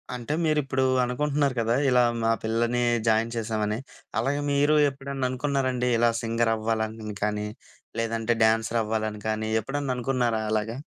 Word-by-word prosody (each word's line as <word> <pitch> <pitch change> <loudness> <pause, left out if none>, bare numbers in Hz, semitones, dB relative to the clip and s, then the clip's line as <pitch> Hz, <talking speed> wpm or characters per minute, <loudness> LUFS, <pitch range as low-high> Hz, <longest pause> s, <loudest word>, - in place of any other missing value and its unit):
అంటే 125 +4 -4
మీరుప్పుడు 145 -4 +1 0.2
అనుకుంటున్నారు 140 +2 0
కదా! 115 +1 +1
ఇలా 125 -1 +5 0.2
మా 115 - +3
పిల్లల్ని 115 +2 0 0.3
జాయిన్ 115 +1 +2
చేసామని 110 -2 -1 0.4
అలాగే 140 +5 0
మీరు 145 +2 +3
ఎప్పుడన్నా 135 -1 -3
అనుకున్నారండి? 130 -1 -1
ఇలా 120 +1 +4
సింగర్ 115 0 +1
అవ్వాలని 110 -1 -2
కానీ, 105 0 -1 0.5
లేదంటే 115 0 0
డ్యాన్సర్ 110 +1 +2
అవ్వాలని 110 -1 -2
కానీ 110 0 -1
ఎప్పుడన్నా 140 0 -2
అనుకున్నారా 120 -3 0
అలాగా? 110 +2 -1
115 Hz, 130 wpm, -26 LUFS, 110-135 Hz, 0.5 s, ఇలా